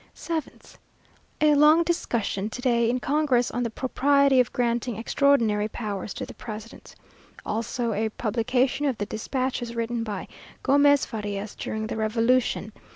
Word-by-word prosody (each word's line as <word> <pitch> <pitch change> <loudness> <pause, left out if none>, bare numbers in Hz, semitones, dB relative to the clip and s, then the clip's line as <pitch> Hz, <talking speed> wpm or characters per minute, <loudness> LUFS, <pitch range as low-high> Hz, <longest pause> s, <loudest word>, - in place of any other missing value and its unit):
7th. 325 -2 -6 0.6
A 305 -1 +5
long 300 +3 +6
discussion 225 - -1
to 250 - -7
day 235 -3 +2
in 250 +1 0
Congress 275 -3 +1
on 245 - -2
the 235 - -1
propriety 275 +3 +2
of 250 - +2
granting 240 -1 -1
extraordinary 225 -4 +2
powers 210 -3 -5
to - - -4
the - - -10
president; 220 0 -9 0.5
also 230 +1 -2
a 220 +2 0
publication 250 +5 0
of 260 -5 -1
the 205 - -2
despatches 240 +2 -3
written 230 0 -2
by 205 -4 -5 0.4
Gomez 285 +1 +4
Farias 205 -2 -5
during 220 0 -4
the 220 - -4
revolution. 225 0 +1
235 Hz, 145 wpm, -25 LUFS, 220-270 Hz, 0.6 s, long